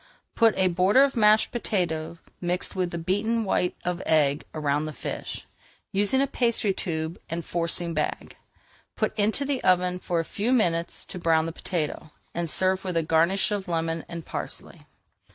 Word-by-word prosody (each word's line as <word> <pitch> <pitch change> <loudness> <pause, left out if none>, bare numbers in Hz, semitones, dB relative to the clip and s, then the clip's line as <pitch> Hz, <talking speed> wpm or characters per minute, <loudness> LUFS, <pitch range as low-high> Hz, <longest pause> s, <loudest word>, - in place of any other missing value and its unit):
Put 225 -2 +4
a 190 -1 +4
border 185 +8 +4
of 275 -1 +1
mashed 215 -1 +4
potato 170 -8 -2 0.2
mixed 180 +3 -1
with 185 -2 0
the 170 - -5
beaten 205 +7 0
white 180 -2 +1
of 180 -1 -1
egg 150 -2 +3
around 150 -1 0
the 155 - -5
fish, - - -6 0.5
using 205 +7 +2
a - - +4
pastry 235 -6 +1
tube 160 -2 -3
and 165 0 -4
forcing 170 0 +1
bag. 155 -1 -3 0.6
Put 215 0 -1
into 220 +6 +1
the 275 -2 -1
oven 180 0 +2
for 175 -2 -1
a 165 - -1
few 210 +8 -2
minutes 170 -8 0
to 180 - -8
brown 160 -2 +3
the 165 - -3
potato, 160 -2 -3 0.2
and 170 -1 -2
serve 190 +3 +2
with 180 -3 -2
a 165 - +2
garnish 165 +6 +2
of 200 -2 -2
lemon 165 -1 -1
and 170 -1 -6
parsley. - - -7
180 Hz, 170 wpm, -26 LUFS, 165-205 Hz, 0.6 s, Put